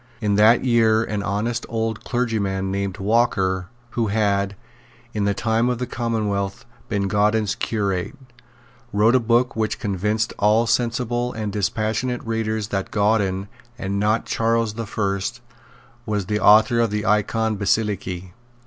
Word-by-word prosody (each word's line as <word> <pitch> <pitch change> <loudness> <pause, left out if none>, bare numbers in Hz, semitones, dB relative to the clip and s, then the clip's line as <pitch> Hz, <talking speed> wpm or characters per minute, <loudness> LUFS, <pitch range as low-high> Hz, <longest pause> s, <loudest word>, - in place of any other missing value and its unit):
In 105 -2 0
that 110 +5 +5
year 115 -2 +4
an 105 -2 -3
honest 105 +5 -2
old 110 -1 -2
clergyman 100 -6 -1
named 100 -1 -2
Walker, 95 -4 +1 0.2
who 115 -2 0
had, 100 -1 0 0.6
in 105 -2 0
the 100 -1 +1
time 115 +3 +1
of 125 - 0
the 125 - -2
Commonwealth, 105 -5 -2 0.2
been 100 -1 0
Gauden's 105 +1 +2
curate, 100 0 -2 0.8
wrote 105 +3 +3
a 130 - +5
book 120 +2 +2
which 110 -1 -1
convinced 105 +3 -1
all 105 +3 +4
sensible 120 +1 0
and 105 -3 -4
dispassionate 110 +5 -1
readers 110 -2 -2
that 95 -1 -2
Gauden, 100 -2 +1 0.3
and 100 -3 -2
not 105 +2 +1
Charles 115 -1 0
the 115 0 -5
First, 100 +3 -2 0.7
was 105 -3 -1
the 105 +2 -1
author 110 +4 +5
of 115 -1 +2
the 105 0 -2
Icon 110 +1 +1
Basilike. 95 -3 -1
110 Hz, 140 wpm, -22 LUFS, 100-115 Hz, 0.8 s, that